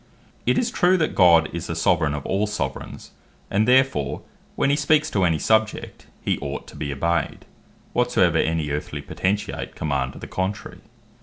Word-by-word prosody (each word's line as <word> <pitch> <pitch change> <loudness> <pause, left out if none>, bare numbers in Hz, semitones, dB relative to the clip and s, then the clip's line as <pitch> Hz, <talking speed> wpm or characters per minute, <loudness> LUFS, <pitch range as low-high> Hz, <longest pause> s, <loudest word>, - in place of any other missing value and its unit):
It - - +3
is 245 -1 +1
true, 185 -2 +3
that 160 -3 0
God 85 -4 +5
is 85 0 -4
the 85 - -3
Soveraign 80 -3 +2
of 70 - -6
all 100 +3 0
Soveraigns; 105 +1 -5 0.4
and 105 +3 +2
therefore, 125 - +2 0.3
when 140 - +2
he - - +3
speaks 150 +1 +2
to 95 -3 +2
any 80 -2 +2
Subject, 110 +4 0 0.2
he - - 0
ought 70 0 -5
to - - -14
be 70 -2 -4
obeyed, 85 +5 -1 0.5
whatsoever - - +2
any 80 -2 0
earthly 75 +1 -4
Potentate 100 +2 -3
command 70 -4 -2
to - - -12
the - - -7
contrary. 95 +2 -4
90 Hz, 170 wpm, -23 LUFS, 75-110 Hz, 0.5 s, God